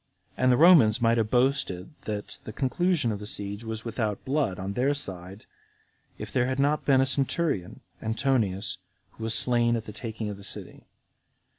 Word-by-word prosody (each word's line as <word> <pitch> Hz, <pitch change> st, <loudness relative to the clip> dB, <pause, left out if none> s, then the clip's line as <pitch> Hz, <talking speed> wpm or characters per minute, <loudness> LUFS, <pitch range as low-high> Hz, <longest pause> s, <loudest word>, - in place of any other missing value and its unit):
And 130 Hz, 0 st, +3 dB
the 125 Hz, -, +4 dB
Romans 150 Hz, -11 st, +6 dB
might 115 Hz, -1 st, +3 dB
have 110 Hz, -1 st, 0 dB
boasted 125 Hz, -8 st, 0 dB
that 105 Hz, -1 st, -5 dB
the -, -, -7 dB
conclusion 145 Hz, -, 0 dB
of 105 Hz, -, -4 dB
that 105 Hz, -, -7 dB
siege 100 Hz, +1 st, -4 dB
was 110 Hz, 0 st, -5 dB
without 110 Hz, -3 st, -3 dB
blood 135 Hz, -9 st, 0 dB
[on 95 Hz, +2 st, -4 dB
their 135 Hz, +6 st, +1 dB
side] 95 Hz, -5 st, -6 dB, 0.7 s
if -, -, -8 dB
there 125 Hz, -1 st, +2 dB
had 130 Hz, +1 st, -2 dB
not 145 Hz, +2 st, +1 dB
been 135 Hz, -2 st, +4 dB
a -, -, +3 dB
centurion, 135 Hz, -, -1 dB, 0.2 s
Antonius, 110 Hz, -5 st, 0 dB, 0.3 s
who 110 Hz, -, -7 dB
was 115 Hz, -, +3 dB
slain 120 Hz, -1 st, +3 dB
at 115 Hz, -1 st, -4 dB
the 105 Hz, -, -8 dB
taking 110 Hz, -1 st, -5 dB
of 105 Hz, -1 st, -5 dB
the 100 Hz, -, -13 dB
city. 100 Hz, -, -7 dB
115 Hz, 180 wpm, -27 LUFS, 105-135 Hz, 0.7 s, Romans